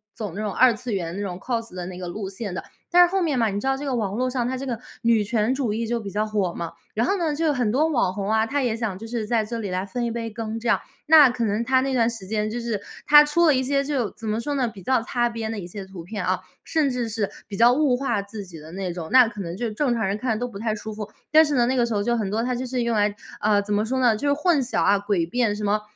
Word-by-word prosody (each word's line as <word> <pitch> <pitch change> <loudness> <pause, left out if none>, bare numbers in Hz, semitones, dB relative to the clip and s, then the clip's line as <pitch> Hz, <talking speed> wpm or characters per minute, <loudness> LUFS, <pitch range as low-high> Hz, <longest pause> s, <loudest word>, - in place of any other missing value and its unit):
走 205 -5 -5
这 210 - -3
种 210 -2 -2
二 255 +2 +5
次 225 +1 -5
元 170 -3 -3
那 200 - -4
种 185 -3 -4
cos 230 -3 -3
的 180 -1 -4
那 180 -1 -7
个 180 - -6
路 190 +2 -5
线 200 -1 -6
的， 180 - -4 0.3
但 355 0 +8
是 345 - -9
后 385 - +1
面 300 -7 +1
嘛， 225 - +3
你 200 - -2
知 - - -6
道 270 0 +2
这 285 +2 -6
个 265 - -1
网 205 -5 -1
络 255 +2 0
上 245 -2 -1
它 260 - -2
这 270 - -5
个 240 -4 -3 0.2
女 230 -3 +3
权 220 +2 +1
主 245 -7 -1
义 225 0 -2
就 235 0 -1
比 200 -3 -7
较 210 +2 0
火 205 -5 -1
嘛， 170 -1 -5 0.2
然 230 +3 +1
后 400 - +1
呢， 325 -4 0
就 325 - -1
有 305 - +3
很 245 -6 0
多 295 +7 +3
网 240 -11 +1
红 200 +1 -3
啊， 220 0 +3
她 280 +5 -1
也 240 -3 0
想 220 -5 -3
就 225 - -8
是 230 -1 -3
在 225 0 +1
这 230 +2 -5
里 205 -3 -4
来 185 +1 -1
分 240 +2 -2
一 230 - -1
杯 230 -1 -3
羹， 220 0 -5
这 235 - -5
样。 - - +4 0.3
那 300 -4 +8
可 240 -1 -2
能 210 +1 0
她 260 +1 +3
那 270 0 -1
段 230 -2 +3
时 225 -5 -7
间 215 +1 -1
就 240 - -3
是 230 -4 -2 0.3
她 295 0 +9
出 335 +4 +2
了 300 - +6
一 260 - +2
些 275 +1 +1
就 270 -7 -1
怎 225 - -11
么 215 +1 0
说 290 +5 -3
呢， 255 -3 +1
比 200 -3 -12
较 255 +4 +2
擦 240 0 0
边 225 -1 -4
的 220 - -4
一 185 - -6
些 195 +2 -7
图 190 -2 -9
片， 205 +4 -5
啊， - - 0 0.2
甚 310 -3 +1
至 245 -2 -2
是 215 -2 -1 0.2
比 200 - -5
较 240 +3 +6
物 270 -3 +2
化 240 -6 0
自 200 0 -8
己 175 -3 -11
的 155 +1 -11
那 190 -1 -3
种， 165 -2 -6
那 255 -2 +7
可 210 -3 -7
能 170 0 -5
就 235 +1 -2
正 245 +3 0
常 225 -4 0
人 195 - 0
看 225 -2 0
都 245 - -2
不 215 - -9
太 220 0 -1
舒 215 0 -7
服， 210 0 -7 0.2
但 315 +1 +8
是 295 -2 0
呢， 240 - +4
那 255 +2 +1
个 240 -2 +3
时 230 - -2
候 205 - +1
就 240 +2 +1
很 215 -4 -1
多 225 +2 0
她 250 - -1
就 255 - -3
是 250 -1 -1
用 235 -1 0
来， 205 -1 +2 0.3
呃， 210 -1 +3
怎 205 +1 -3
么 210 - +2
说 260 +4 -1
呢？ 240 -3 +4
就 285 +6 +1
混 305 -2 +2
淆 250 - -1
啊， 200 - +4
诡 200 -5 0
辩 235 -2 +1
什 210 - -5
么 210 +1 +1
230 Hz, 345 characters per minute, -24 LUFS, 205-255 Hz, 0.3 s, 她